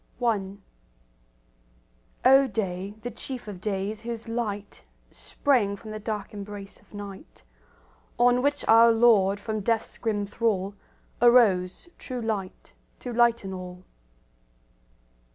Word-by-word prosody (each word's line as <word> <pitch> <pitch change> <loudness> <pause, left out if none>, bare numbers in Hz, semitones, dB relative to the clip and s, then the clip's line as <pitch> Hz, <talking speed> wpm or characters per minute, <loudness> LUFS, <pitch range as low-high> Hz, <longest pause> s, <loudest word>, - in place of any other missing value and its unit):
I 200 -4 0 1.7
O 270 +1 +7
day, 195 -2 -3
the 245 - -4
chief 255 -4 -7
of 195 -4 -8
days, 205 +1 -3
whose 230 0 -6
light 210 -3 -4 0.3
Sprang 235 -9 0
from 215 +2 -10
the 215 - -5
dark 210 -1 -5
embrace 200 -1 -8
of - - -27
night, 200 -2 -10 0.7
On 245 +1 +4
which 285 +2 0
our 230 +1 +7
Lord 215 -4 +4
from 215 +1 -3
death's 225 +2 -1
grim 210 -3 -1
thrall 205 -2 -1 0.5
Arose, 220 - +4
True 255 -2 -5
Light, 215 -5 -4 0.2
to 245 - -6
lighten 235 -4 +2
all. 180 0 -8
215 Hz, 115 wpm, -26 LUFS, 195-235 Hz, 1.7 s, O